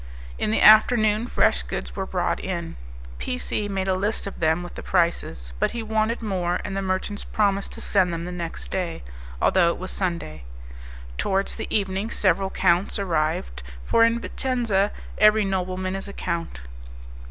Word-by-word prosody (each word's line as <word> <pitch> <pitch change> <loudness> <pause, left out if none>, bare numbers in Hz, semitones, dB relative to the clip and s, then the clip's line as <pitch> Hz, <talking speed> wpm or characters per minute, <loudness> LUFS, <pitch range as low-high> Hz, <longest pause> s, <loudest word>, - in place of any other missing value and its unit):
In - - 0
the 220 - +1
afternoon 215 0 +6
fresh 65 - +2
goods - - -5
were - - -3
brought - - -1
in; - - -4 0.4
P 250 - -3
C 215 -4 -2
made 195 -1 -2
a 190 - +2
list 205 +5 -1
of 200 - -7
them 160 +2 +2
with 175 - -9
the - - -7
prices; 170 - 0
but - - +2
he 235 -1 -3
wanted 220 +2 0
more, 180 -4 -1
and 195 - -4
the 195 - -1
merchants 190 +2 -2
promised 200 -2 0
to - - -6
send 185 -3 +2
them 170 0 -4
the 180 - -5
next 170 -2 -6
day, 180 - -3 0.4
although 185 -2 +4
it - - -2
was 185 +1 -5
Sunday. 170 - -3 0.8
Towards 195 +1 0
the - - -5
evening 195 +1 -1
several 195 -3 +1
counts 175 +2 +2
arrived, 155 - -1 0.2
for 230 - +4
in 230 +1 +3
Vicenza 230 -6 0 0.3
every 215 0 +5
nobleman 185 0 -2
is 195 - -4
a 200 - -8
count. 165 - -4
190 Hz, 175 wpm, -24 LUFS, 175-210 Hz, 0.8 s, afternoon